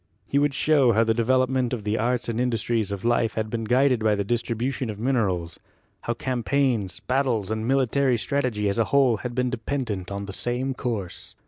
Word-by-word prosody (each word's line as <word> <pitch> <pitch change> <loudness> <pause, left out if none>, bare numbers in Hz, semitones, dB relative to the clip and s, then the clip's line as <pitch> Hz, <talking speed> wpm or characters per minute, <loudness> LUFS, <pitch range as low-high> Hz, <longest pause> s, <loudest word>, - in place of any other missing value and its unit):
He 140 - +1
would 145 -1 +1
show 140 -6 +4
how 110 +2 +4
the 110 0 +2
development 130 +2 +1
of 115 -4 -3
the 105 +1 0
arts 125 +1 0
and 115 0 -1
industries 115 -3 0
of 100 +1 -5
life 120 -1 +1
had 110 -1 -2
been 115 -1 -2
guided 125 +2 +3
by 110 -1 +3
the 100 - -1
distribution 120 +3 -2
of 105 - -5
minerals, 100 -9 -1 0.5
how 120 - -1
cam 130 -1 -2
paigns, 120 -8 0
battles 125 -6 0
and 110 +1 -2
military 135 -1 +2
strategy 120 -4 -1
as 100 +3 0
a 115 - +3
whole 135 -5 +3
had 120 +2 -6
been 125 -1 0
dependent 115 -6 -3
on 100 0 -4
the 100 - -7
same 125 +5 -2
course. 110 -8 -5
120 Hz, 200 wpm, -25 LUFS, 110-130 Hz, 0.5 s, show